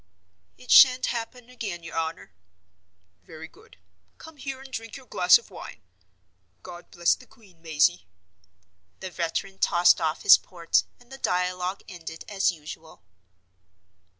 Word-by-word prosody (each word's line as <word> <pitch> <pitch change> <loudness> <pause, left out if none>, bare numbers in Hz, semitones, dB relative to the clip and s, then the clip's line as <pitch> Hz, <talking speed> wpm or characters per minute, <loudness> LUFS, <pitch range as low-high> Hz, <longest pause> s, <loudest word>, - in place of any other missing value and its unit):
"It 250 - -9
shan't 255 -1 +7
happen 240 +1 -5
again, 205 -9 -7
your 165 - -9
honor." 160 - -4 0.9
"Very 160 - -11
good. 440 - -21 0.4
Come 320 -1 -14
here, 270 -1 -6
and 265 -1 -14
drink 225 -2 -6
your 265 - -15
glass 180 -6 +5
of 235 -3 -17
wine. 115 - -11 0.8
God 175 0 -11
bless 170 -1 +2
the 255 - -12
Queen, 205 -8 -22
Mazey." 145 - +1 0.9
The 190 - -7
veteran 175 +3 -4
tossed 175 0 +4
off 160 -1 -2
his - - +8
port, 170 -2 -1
and 245 +1 -23
the 270 - -10
dialogue 180 0 -2
ended 165 -4 -9
as 195 -2 +1
usual. 155 - -12
180 Hz, 140 wpm, -25 LUFS, 165-240 Hz, 0.9 s, his